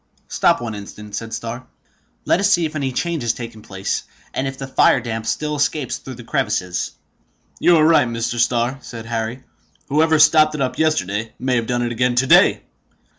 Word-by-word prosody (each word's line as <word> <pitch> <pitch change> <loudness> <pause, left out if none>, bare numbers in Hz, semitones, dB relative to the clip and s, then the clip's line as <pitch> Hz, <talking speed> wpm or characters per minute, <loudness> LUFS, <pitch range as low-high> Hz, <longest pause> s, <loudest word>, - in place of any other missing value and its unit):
"Stop - - +2
one 115 -2 -4
instant," 105 0 -10
said 115 0 -5
Starr. 115 +2 -6 0.6
"Let - - +3
us 200 +1 +2
see 175 -3 +3
if 155 0 -5
any 135 -3 -1
change 170 +3 -2
has 120 -1 0
taken 115 -2 -8
place, 95 -2 -3 0.3
and 135 - -1
if 135 0 -5
the 135 - -5
fire 135 0 +4
damp 115 -2 -5
still 150 +3 -1
escapes 145 -1 -1
through 130 - -9
the 120 - -11
crevices." 90 -5 -2 0.7
"You 175 -1 +5
are 155 - +4
right, 160 -6 +5
Mr. 115 0 -3
Starr," 120 +2 +1
said 115 -2 -9
Harry. 115 +2 -3 0.5
"Whoever 160 +2 +3
stopped 155 0 +5
it 145 - -3
up 130 -1 -2
yesterday 115 -9 0
may 130 -1 0
have 115 -2 -1
done 120 0 0
it 120 - -2
again 120 +1 +1
to 125 +2 +3
day!" - - +5
125 Hz, 195 wpm, -20 LUFS, 115-150 Hz, 0.7 s, You